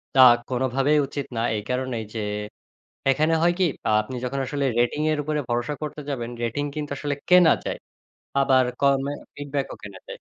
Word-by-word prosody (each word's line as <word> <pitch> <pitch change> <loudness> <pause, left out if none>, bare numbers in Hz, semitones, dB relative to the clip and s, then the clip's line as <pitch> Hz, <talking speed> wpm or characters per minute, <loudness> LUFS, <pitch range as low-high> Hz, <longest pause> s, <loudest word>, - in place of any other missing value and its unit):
তা 130 - +7 0.3
কোনোভাবেই 130 +3 +2
উচিত 140 -2 -4
না। - - +1
এই 105 - -3
কারণেই 125 -3 -2
যে, 110 - -2 0.9
এখানে 155 +4 +2
হয় 175 +1 +4
কি, 185 - +4 0.2
আ - - +3
আপনি 115 +4 -8
যখন 135 +2 -2
আসলে 140 0 -1
রেটিং 120 +5 +1
এর 155 - 0
উপরে 150 +1 -1
ভরসা 120 +4 -1
করতে 150 0 -5
যাবেন, 120 -4 -3
রেটিং 120 +5 -1
কিন্তু 150 -1 -4
আসলে 145 -1 -2
কেনা 180 -2 +7
যায়। - - -3 0.6
আবার 130 -2 +4 0.2
কমে 140 0 +2 0.2
ফিডব্যাক 145 -1 -3
ও - - -8
কেনা 100 -2 -9
যায়। - - -7
135 Hz, 180 wpm, -24 LUFS, 125-150 Hz, 0.9 s, তা